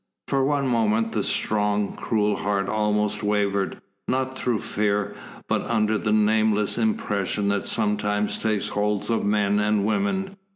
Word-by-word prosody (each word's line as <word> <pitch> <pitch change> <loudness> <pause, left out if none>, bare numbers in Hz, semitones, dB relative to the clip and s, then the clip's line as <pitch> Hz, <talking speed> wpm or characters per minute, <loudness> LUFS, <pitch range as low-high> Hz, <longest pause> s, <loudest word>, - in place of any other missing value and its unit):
For 135 -1 +2
one 140 0 +1
moment 115 -2 +1
the - - -1
strong, 105 -1 0
cruel 105 -2 0
heart 100 -1 -1
almost 105 0 0
wavered, 100 -2 0 0.3
not 130 0 -1
through 125 -3 0
fear, 105 0 -1 0.3
but - - +1
under 110 -1 +1
the 110 - -1
nameless 110 -1 +2
impression 105 - 0
that 100 0 -1
sometimes 105 0 0
takes 110 -2 -1
hold 105 +2 -1
of 115 - +1
men 105 0 +2
and 105 -1 +1
women. 195 - -1
105 Hz, 140 wpm, -24 LUFS, 105-115 Hz, 0.3 s, For